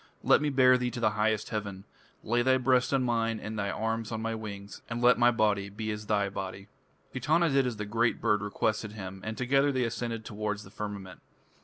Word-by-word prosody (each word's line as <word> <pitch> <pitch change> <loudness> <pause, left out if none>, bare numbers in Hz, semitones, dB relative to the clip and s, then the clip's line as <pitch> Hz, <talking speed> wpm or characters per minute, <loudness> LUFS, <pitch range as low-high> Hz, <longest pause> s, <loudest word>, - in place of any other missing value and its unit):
Let - - +5
me 150 - +1
bear 130 -2 +5
thee 125 0 0
to 120 - -6
the 110 -2 +2
highest 105 0 0
heaven. 100 -3 -4 0.4
Lay 120 +2 +1
thy 130 +1 +4
breast 125 0 +2
on 135 -2 +2
mine 115 -2 0
and 110 0 -5
thine 100 0 -1
arms 115 +1 -2
on 110 - -2
my 115 0 -2
wings, 100 -2 -7
and 115 0 -3
let 120 0 +5
my 120 0 +6
body 105 -4 +1
be 110 +2 -4
as 105 0 -6
thy 100 -2 +2
body." 95 0 -6 0.4
Etana 155 +7 +2
did 135 -2 +2
as 120 -3 -4
the 105 - -4
great 115 +3 +1
bird 105 -1 +2
requested 105 +1 -1
him, 95 -2 -7
and 110 0 -5
together 135 +3 +2
they 130 -2 0
ascended 115 -1 -3
towards 105 -1 -3
the 100 - -14
firmament. 100 -4 -7
110 Hz, 215 wpm, -29 LUFS, 105-120 Hz, 0.4 s, my